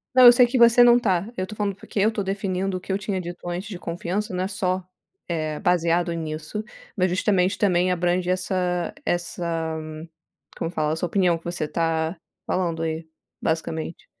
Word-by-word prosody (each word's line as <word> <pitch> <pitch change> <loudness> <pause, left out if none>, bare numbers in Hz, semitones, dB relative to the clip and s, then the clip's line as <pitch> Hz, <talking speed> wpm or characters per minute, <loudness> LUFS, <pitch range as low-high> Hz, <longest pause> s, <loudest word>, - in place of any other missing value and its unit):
Não 255 - +8
eu 240 - +12
sei 245 0 +6
que 250 +2 0
você 235 0 +7
não 240 0 +7
tá. 195 0 0
Eu 185 - -1
tô 210 +2 -9
falando 205 -2 -1
porque 200 +1 -5
eu 215 +3 +4
tô 210 -2 -2
definindo 195 -1 -1
o - - -6
que 190 - -6
eu 190 - +2
tinha 195 -2 -3
dito 175 0 -8
antes 180 +4 -4
de 185 - -5
confiança 180 +4 -3
não 180 +1 -1
é - - -1
só, 185 -2 -1 0.4
eh, 155 -3 -2
baseado 175 -2 +2
nisso, 160 +5 -4 0.3
mas 185 -1 +2
justamente 185 0 +2
também 180 -2 +2
abrange 175 0 +1
essa 180 -1 0
essa 165 -2 -2 0.8
como 165 - -2
fala, 155 -2 0
a - - -1
sua 170 +2 -2
opinião 175 -1 +2
que 165 - -18
você 170 -3 -2
tá 160 +2 -1 0.3
falando 170 -3 -1
aí, 160 0 -3 0.3
basicamente. 160 0 -3
180 Hz, 190 wpm, -24 LUFS, 165-195 Hz, 0.8 s, eu